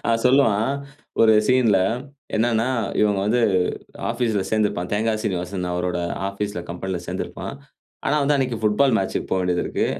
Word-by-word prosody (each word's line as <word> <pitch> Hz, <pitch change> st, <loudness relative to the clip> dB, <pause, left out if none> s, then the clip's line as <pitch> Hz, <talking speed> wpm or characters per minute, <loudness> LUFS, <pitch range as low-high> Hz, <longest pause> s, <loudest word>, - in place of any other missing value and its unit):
அவன் 115 Hz, 0 st, +2 dB
சொல்லுவான். 125 Hz, -3 st, +3 dB, 0.5 s
ஒரு 110 Hz, -1 st, +7 dB
சீன்ல 120 Hz, -6 st, +4 dB, 0.6 s
என்னான்னா, 115 Hz, +1 st, +2 dB, 0.3 s
இவுங்க 105 Hz, -2 st, +3 dB
வந்து 120 Hz, +4 st, +2 dB, 0.7 s
ஆஃபீஸ்ல 115 Hz, -4 st, 0 dB
சேந்துருப்பான். 105 Hz, -5 st, 0 dB
தேங்கா 110 Hz, +2 st, +1 dB
சீனிவாசன் 90 Hz, -1 st, -2 dB
அவரோட 90 Hz, 0 st, -1 dB, 0.3 s
ஆபீஸ்ல 100 Hz, -2 st, -4 dB
கம்பெனில 90 Hz, +1 st, -3 dB
சேந்திருப்பான். -, -, -5 dB, 0.5 s
ஆனா, 145 Hz, -, +2 dB
வந்து 145 Hz, +1 st, +3 dB
அன்னைக்கு 130 Hz, -3 st, 0 dB
புட்பால் 115 Hz, +4 st, +3 dB
மேட்ச்க்கு 95 Hz, -, -2 dB
போவேண்டியததிருக்கு. 90 Hz, -2 st, 0 dB
105 Hz, 125 wpm, -22 LUFS, 95-120 Hz, 0.7 s, ஒரு